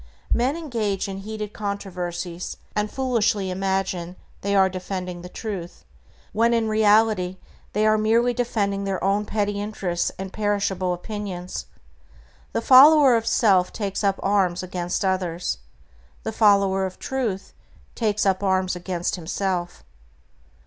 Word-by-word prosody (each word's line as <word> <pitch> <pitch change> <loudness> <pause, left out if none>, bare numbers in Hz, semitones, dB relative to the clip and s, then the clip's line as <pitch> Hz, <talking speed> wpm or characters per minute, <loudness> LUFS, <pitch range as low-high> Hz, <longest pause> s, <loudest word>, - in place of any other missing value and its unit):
Men 260 +6 +1
engage 225 - -2
in 195 0 -5
heated 210 +1 -6
controversies, 180 -4 -4 0.2
and 210 0 0
foolishly 220 -7 0
imagine 190 -2 -2 0.3
they 200 0 0
are 190 -1 +5
defending 185 -1 -5
the 180 - -9
Truth, 190 -5 -6 0.5
when 230 +3 +3
in 225 -1 +1
reality 215 -3 +3 0.4
they 210 +1 +2
are 215 0 +4
merely 230 +3 +3
defending 205 -5 -1
their 195 -1 -1
own 200 +2 +1
petty 205 -1 -1
interests 190 -5 -2
and 190 0 -6
perishable 200 -3 0
opinions. 185 -1 -6 0.8
The - - -1
follower 275 +1 +8
of 225 0 -1
self 195 -5 +3
takes 200 -2 -3
up 195 -1 +1
arms 185 -3 +1
against 180 +1 -2
others. 180 - -1 0.6
The - - -2
follower 195 -2 +3
of 185 - -10
Truth 235 -8 -3 0.4
takes 210 -3 0
up 190 -1 +2
arms 190 -2 +1
against 180 0 -3
himself. 175 +1 -3
200 Hz, 130 wpm, -24 LUFS, 185-215 Hz, 0.8 s, follower